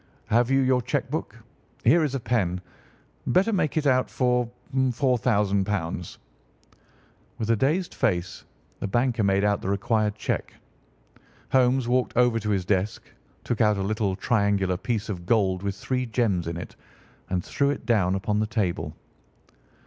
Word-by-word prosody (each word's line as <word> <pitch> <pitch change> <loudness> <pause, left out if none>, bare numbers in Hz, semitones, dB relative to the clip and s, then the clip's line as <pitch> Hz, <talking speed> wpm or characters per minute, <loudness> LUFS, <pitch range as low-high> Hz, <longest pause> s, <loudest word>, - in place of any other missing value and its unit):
Have 120 +2 +3
you 135 0 +3
your 130 -1 +3
cheque 125 +1 -2
book? - - -4 0.5
Here 170 0 +5
is 140 -3 -1
a - - -1
pen. 100 -7 0 0.7
Better 195 +5 +3
make 160 -6 0
it 155 - +1
out 130 -2 +3
for 125 -2 +1 0.3
£ 130 -1 +3
4000." 105 -8 0 1.2
With 115 0 -1
a - - +4
dazed 155 - 0
face 90 -3 -1 0.4
the - - -2
banker 120 +2 +1
made 100 0 +2
out 105 -1 +1
the - - -3
required 105 0 +1
check. 110 - -3 1.0
Holmes 130 -1 +3
walked 125 -1 0
over 125 -2 +4
to 105 -1 -4
his 95 -3 0
desk, 100 +2 0 0.4
took 120 -1 -1
out 105 -2 +4
a 95 - -1
little 105 -1 0
triangular 100 -3 +1
piece 110 +2 -2
of 90 -4 -6
gold 95 -5 +2
with 100 -1 -2
three 125 +5 -2
gems 110 -7 0
in 85 0 -3
it, 85 - -8 0.5
and 90 -1 -1
threw 140 0 +1
it 145 - -3
down 95 -6 +2
upon 105 +2 -1
the 110 - 0
table. 105 -6 -2
110 Hz, 160 wpm, -25 LUFS, 100-125 Hz, 1.2 s, Here